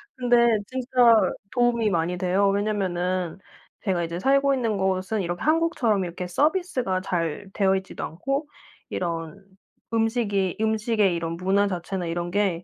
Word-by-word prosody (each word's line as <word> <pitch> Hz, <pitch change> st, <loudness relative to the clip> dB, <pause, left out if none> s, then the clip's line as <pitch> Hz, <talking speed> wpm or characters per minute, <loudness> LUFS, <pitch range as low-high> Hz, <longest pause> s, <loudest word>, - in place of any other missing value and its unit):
근데 240 Hz, -3 st, +4 dB
진짜 245 Hz, -3 st, +3 dB, 0.2 s
도움이 240 Hz, -3 st, +2 dB
많이 175 Hz, +1 st, 0 dB
돼요. 190 Hz, +2 st, +2 dB
왜냐면은 185 Hz, -4 st, -1 dB, 0.5 s
제가 185 Hz, -4 st, 0 dB
이제 170 Hz, +1 st, -4 dB
살고 275 Hz, +3 st, +3 dB
있는 230 Hz, -6 st, 0 dB
곳은 190 Hz, +2 st, 0 dB
이렇게 175 Hz, 0 st, -4 dB
한국처럼 305 Hz, -, +2 dB
이렇게 180 Hz, +1 st, -5 dB
서비스가 270 Hz, -, 0 dB
잘 180 Hz, 0 st, -3 dB
되어 195 Hz, -1 st, +2 dB
있지도 190 Hz, 0 st, -5 dB
않고 275 Hz, -, -3 dB, 0.4 s
이런 170 Hz, +2 st, -4 dB, 0.5 s
음식이 220 Hz, -5 st, 0 dB
음식의 220 Hz, -3 st, +1 dB
이런 165 Hz, 0 st, -3 dB
문화 195 Hz, +3 st, +2 dB
자체나 180 Hz, 0 st, -3 dB
이런 175 Hz, +1 st, -3 dB
게 190 Hz, -4 st, 0 dB
195 Hz, 310 characters per minute, -25 LUFS, 180-235 Hz, 0.5 s, 근데